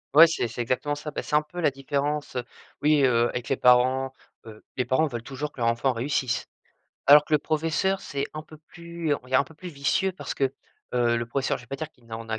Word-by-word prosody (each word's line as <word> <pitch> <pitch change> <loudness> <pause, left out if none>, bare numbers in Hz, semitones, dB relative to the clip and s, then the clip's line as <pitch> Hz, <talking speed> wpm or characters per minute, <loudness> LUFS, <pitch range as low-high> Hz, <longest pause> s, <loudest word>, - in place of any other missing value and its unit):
Ouais 160 +2 +11
c'est 160 -7 -1
c'est 115 +2 -5
exactement 130 +5 -1
ça. 150 +1 -6
Bah, - - -3
c'est - - -2
un 150 - +4
peu 150 +4 -9
la 155 - +4
différence, 140 +2 -2
heu, 125 - -1 0.4
oui, 150 -1 +4
heu 120 -2 +3
avec 125 -1 -5
les 135 - +2
parents, 130 +1 +4 0.4
heu, 110 -1 -12
les 125 - +1
parents 130 +6 +2
veulent 120 -6 -4
toujours 140 +4 -5
que 130 - -10
leur 115 - +3
enfant 115 +3 +1
réussisse. 125 0 -1 0.6
Alors 145 +2 +8
que - - -10
le - - +5
professeur 165 +6 0
c'est 140 0 -3
un 155 - -6
peu 155 - -14
plus 170 0 -5
on 125 - -9
il 130 - -13
est - - +6
un 140 - +5
peu 160 +3 -14
plus 180 +3 -9
vicieux 160 +6 0
parce 185 - -6
que, 140 - 0 0.5
heu, 120 -1 +2
le 115 0 -2
professeur, 135 +3 -1
je 125 - -13
vais - - -22
pas 135 - -5
dire 155 +1 -5
qu'il 125 -6 -26
n'en 115 0 -7
a 110 0 -2
140 Hz, 255 wpm, -26 LUFS, 125-150 Hz, 0.6 s, Ouais